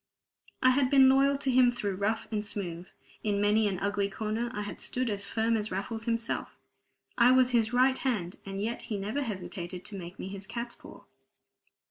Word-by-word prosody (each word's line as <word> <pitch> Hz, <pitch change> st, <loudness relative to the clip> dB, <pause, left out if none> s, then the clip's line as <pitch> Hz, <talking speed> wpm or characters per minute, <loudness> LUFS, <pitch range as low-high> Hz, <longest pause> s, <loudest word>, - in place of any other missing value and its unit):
I 255 Hz, -, +7 dB
had 260 Hz, 0 st, +2 dB
been 265 Hz, -1 st, +7 dB
loyal 275 Hz, +1 st, +4 dB
to 275 Hz, -1 st, 0 dB
him 250 Hz, -1 st, +6 dB
through 215 Hz, -5 st, -2 dB
rough 215 Hz, +4 st, -1 dB
and 210 Hz, -1 st, -1 dB
smooth. 185 Hz, -4 st, -4 dB, 0.4 s
In 205 Hz, -2 st, 0 dB
many 210 Hz, +1 st, +3 dB
an 195 Hz, -2 st, -1 dB
ugly 200 Hz, 0 st, 0 dB
corner 220 Hz, +3 st, -2 dB
I 210 Hz, -, -4 dB
had 205 Hz, -, -6 dB
stood 250 Hz, -2 st, -1 dB
as 200 Hz, -1 st, -3 dB
firm 225 Hz, +2 st, +1 dB
as 215 Hz, -1 st, -1 dB
Raffles 220 Hz, +4 st, -4 dB
himself. 230 Hz, -1 st, -2 dB, 0.6 s
I 240 Hz, +1 st, +7 dB
was 255 Hz, 0 st, +5 dB
his 230 Hz, -2 st, +3 dB
right 260 Hz, +1 st, +3 dB
hand, 205 Hz, -10 st, -2 dB
and 195 Hz, 0 st, -5 dB
yet 225 Hz, +4 st, -2 dB
he 210 Hz, -, -1 dB
never 210 Hz, +8 st, -2 dB
hesitated 185 Hz, -5 st, -5 dB
to 200 Hz, -2 st, -6 dB
make 175 Hz, +1 st, -9 dB
me -, -, -6 dB
his 195 Hz, 0 st, -7 dB
catspaw. 235 Hz, 0 st, -7 dB
220 Hz, 190 wpm, -29 LUFS, 200-245 Hz, 0.6 s, I